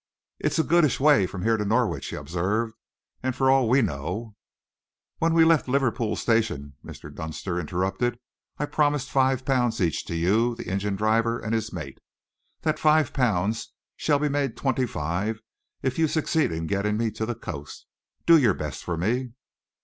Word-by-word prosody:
"It's - - 0
a 160 - +3
goodish 165 -4 +3
way 135 -10 +5
from 90 0 -6
here 115 0 +2
to 105 - -1
Norwich," 110 +3 0
he - - -5
observed, 105 +7 -2 0.5
"and 130 -1 -2
for 130 0 +3
all 135 -4 +3
we 130 +2 +4
know 100 +7 -4 0.4
" - - -67
"When 165 0 +2
we 165 -1 +6
left 165 -4 +3
Liverpool 125 -4 0
Street 115 +1 +2
Station," 70 -10 -6
Mr. 75 - -10
Dunster 80 +4 -4
interrupted, 95 +8 -1 0.4
"I 150 - -1
promised 145 -2 0
five 130 -1 +2
pounds 125 -4 +1
each 85 -4 0
to - - -4
you, 110 +8 +2
the - - -8
engine 100 +2 -1
driver, 115 +3 +1
and 110 -1 -4
his 110 -2 -1
mate. - - -7 0.6
That 155 -1 0
five 155 -3 +3
pounds 110 -3 0 0.2
shall 145 -2 +2
be 150 +1 0
made 140 -3 -1
twenty 130 -2 0
five 95 +6 -2 0.4
if 130 +3 -1
you 160 - +4
succeed 155 - +1
in 80 0 -3
getting 100 +4 0
me 115 -1 0
to 110 +1 -4
the 120 - -2
coast. 75 -10 -8 0.4
Do 165 -1 +7
your 115 -9 +3
best 75 -2 -5
for 85 -2 -3
me." 120 +7 -1
115 Hz, 180 wpm, -25 LUFS, 95-135 Hz, 0.6 s, Do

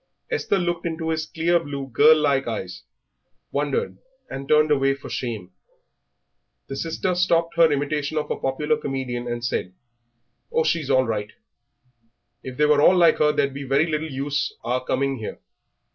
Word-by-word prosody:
Esther 450 - 0
looked 175 -2 -1
into 160 0 -3
his 160 -1 -2
clear 170 +2 +1
blue, 145 -4 -5
girl 150 +5 +6
like 140 -2 +1
eyes, - - -5 0.7
wondered, 465 +1 -1 0.3
and 135 0 -6
turned 150 0 +4
away 135 -1 +3
for 135 - -10
shame. 110 -7 -4 1.2
The 135 - -5
sister 165 +5 -2
stopped 170 -2 +1
her 165 -2 +5
imitation 145 +1 -1
of 150 - -2
a - - +1
popular 150 +11 -1
comedian, 130 - -4
and 120 0 -3
said, 90 -6 -2 0.8
"Oh, 160 - +2
she's 155 -3 0
all 130 -1 +4
right; 105 -3 -3 1.1
if 130 -1 -8
they 150 - +4
were 150 -1 +4
all 185 +4 +6
like 170 -2 +5
her 150 0 +4
there'd 140 -2 0
be 140 - -6
very 135 +3 +2
little 160 -1 -2
use 140 +1 -2
our 125 +2 -1
coming 135 +1 -1
here." 110 - -6
145 Hz, 165 wpm, -23 LUFS, 135-160 Hz, 1.2 s, girl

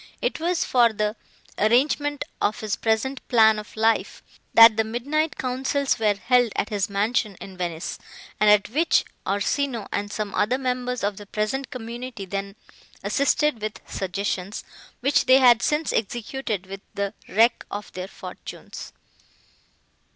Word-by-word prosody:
It - - -1
was 345 +1 0
for 240 -2 +4
the 210 0 -1 0.4
arrangement 290 +6 +2 0.2
of 210 - 0
his 215 -2 -1
present 230 +5 -1
plan 220 -3 +5
of 210 +1 -11
life, 225 +1 +1 0.3
that 225 -1 +9
the 220 - +2
midnight 285 +8 -1
councils 265 +1 -1
were 210 -2 +2
held 245 +2 +2
at - - -1
his 205 -3 -1
mansion 210 +1 0
in 190 - -9
Venice, 175 -2 -4 0.4
and 210 0 +5
at 210 -1 +5
which 315 +8 +2 0.2
Orsino 225 +4 -1
and 205 0 -2
some 215 -2 -4
other 220 +5 +1
members 250 -2 -2
of 200 -1 -1
the 205 - -10
present 225 +6 -2
community 240 -2 -7
then 195 +1 -5 0.5
assisted 285 -3 +1
with 215 0 -4
suggestions, 195 0 -3 0.4
which 275 +3 +2
they 260 +1 +8
had 245 -4 +6
since 300 +1 0
executed 220 -2 -2
with 195 +1 -8
the 200 0 -2 0.2
wreck 230 +4 +3
of 205 +1 -6
their 185 0 -5
fortunes. - - -9
225 Hz, 145 wpm, -24 LUFS, 205-255 Hz, 0.5 s, that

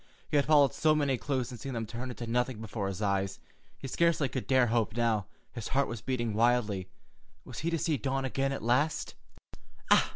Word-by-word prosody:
He - - -3
had 145 -1 +3
followed 145 -3 +5
so 155 -1 +3
many 145 -3 +2
clues 130 -1 -2
and 120 - -8
seen 135 +4 -5
them 115 -1 -2
turn 120 +4 -6
into 120 -1 -6
nothing 125 0 0
before 105 -2 -4
his 100 +2 -4
eyes, 95 -1 0 0.4
he 135 - -7
scarcely 165 0 +2
could 130 -1 -4
dare 130 -2 +4
hope 115 -2 0
now. 110 -4 +1 0.3
His 115 -4 -5
heart 140 +1 +1
was 120 -3 -6
beating 120 -3 -1
wildly. 110 -4 +1 0.6
Was - - -7
he 165 - -1
to 165 - 0
see 160 -2 0
Dawn 135 +3 -1
again 135 +1 0
at 135 - -4
last? 130 +7 +1
125 Hz, 200 wpm, -30 LUFS, 110-135 Hz, 0.6 s, followed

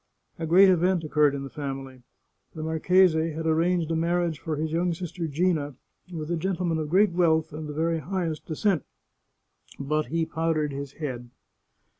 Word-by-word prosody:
A 165 - -3
great 185 +4 +7
event 180 -1 +3
occurred 150 -2 +2
in 140 - -4
the 135 - -7
family. 135 -3 -6 0.5
The 155 - -5
marchese 160 0 +3
had 160 +1 -5
ar 160 - +3
ranged 170 0 +1
a - - +1
marriage 170 -1 0
for 160 -2 -3
his 155 +1 -2
young 170 +1 0
sister 170 0 -5
Gina 150 -2 0 0.4
with 160 -1 -5
a 170 - 0
gentle 180 +1 -2
man 165 -2 0
of 155 -1 -3
great 195 +4 +4
wealth 160 -3 +2
and 155 0 -6
the - - -5
very 165 +2 0
highest 170 -3 -3
descent. 175 - 0 1.0
But 150 +1 -1
he 165 +4 0
powdered 160 -2 -1
his 140 0 -6
head. 125 -6 -5
160 Hz, 180 wpm, -26 LUFS, 150-175 Hz, 1.0 s, great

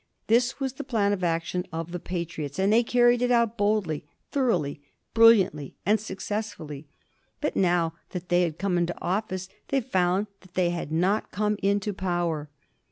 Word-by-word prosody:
This 240 +4 +2
was 265 -2 -2
the - - -6
plan 215 -6 +1
of 185 -2 -3
action 170 +1 0
of 165 +1 -4
the 180 - -4
Patriots, 170 -5 -4
and 195 +2 +3
they 230 - +6
carried 240 0 +3
it 245 - +2
out 235 -2 +3
boldly, 205 -8 0 0.3
thoroughly, 225 - 0 0.3
brilliantly, 205 -11 +5
and 210 +3 +3
successfully. 195 -7 -5 0.5
But 300 - -2
now 175 -3 +2 0.2
that 180 -1 -6
they 175 0 +4
had 165 -3 -1
come 185 -2 0
into 175 0 -1
office 185 -1 -2 0.2
they 275 - +1
found 190 -5 +1
that 185 -2 -21
they 180 -2 +2
had 170 -3 -4
not 185 +7 +1
come 210 +2 0
into 200 +1 +1
power. 175 -5 -2
190 Hz, 165 wpm, -26 LUFS, 170-220 Hz, 0.5 s, they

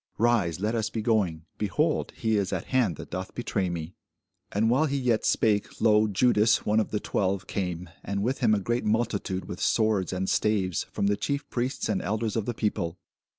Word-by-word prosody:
Rise, 105 -8 +2
let 105 +3 0
us 115 -1 0
be 110 -1 -4
going: 95 -8 +1 0.2
behold, 150 - 0
he 110 -1 +1
is 100 -2 0
at - - -2
hand 115 -10 +3
that - - -10
doth - - -5
betray 95 -2 -1
me. 85 0 -5 0.6
And 105 +2 +2
while 135 +7 +3
he 140 0 -1
yet 125 -4 +1
spake, 105 -2 +1
lo, 110 -1 +4
Judas, 110 +1 +3
one 105 +1 +3
of 110 - 0
the 105 - -1
twelve, 95 -2 -1
came, 90 -2 -3 0.2
and 100 0 -2
with 130 +5 -1
him 115 -5 +4
a - - 0
great 120 +5 -1
multitude 105 -4 -1
with 90 - -7
swords 110 -4 +2
and 95 0 -2
staves, 95 -5 +1
from - - -1
the 100 0 +3
chief 140 +5 -2
priests 125 +3 -1
and 190 - 0
elders 110 - -2
of 110 -2 -1
the 120 - -2
people. 90 -6 -1
105 Hz, 200 wpm, -27 LUFS, 95-115 Hz, 0.6 s, lo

